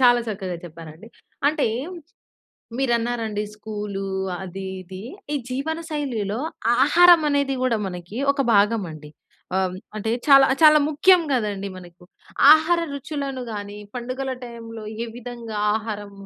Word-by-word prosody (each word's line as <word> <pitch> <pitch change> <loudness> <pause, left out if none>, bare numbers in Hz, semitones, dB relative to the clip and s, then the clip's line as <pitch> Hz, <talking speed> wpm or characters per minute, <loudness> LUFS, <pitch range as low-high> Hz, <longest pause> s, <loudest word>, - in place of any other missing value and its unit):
చాలా 245 -1 +6
చక్కగా 190 -4 -4
చెప్పారండి. 165 +3 -11 0.4
అంటే, 300 0 +1 1.1
మీరన్నారండి 235 -4 0
స్కూలు, 210 -2 -5 0.4
అది, 190 +1 -7 0.2
ఇది. 185 +1 -9 0.3
ఈ - - +2
జీవనశైలిలో 275 -7 -3 0.4
ఆహారం 345 +3 +7
అనేది 280 -1 +1
కూడా 250 -3 +2
మనకి 180 +2 -7 0.2
ఒక 280 - -3
భాగమండి. 195 -8 +1 0.5
ఆహ్, 185 -1 0 0.2
అంటే, 220 +1 -2 0.2
చాలా 275 -1 +8 0.2
చాలా 305 0 +8
ముఖ్యం 350 +5 +5
కదండీ! 205 -5 -1
మనకు. 175 -1 -14 0.5
ఆహార 325 +2 +2
రుచులను 280 -2 -4
గాని, 205 0 -6 0.2
పండుగల 255 +2 -4
టైంలో, 230 -2 -9 0.2
ఏ - - -6
విధంగా 235 -2 -7 0.2
ఆహారం, 210 -2 -6
230 Hz, 115 wpm, -23 LUFS, 200-275 Hz, 1.1 s, చాలా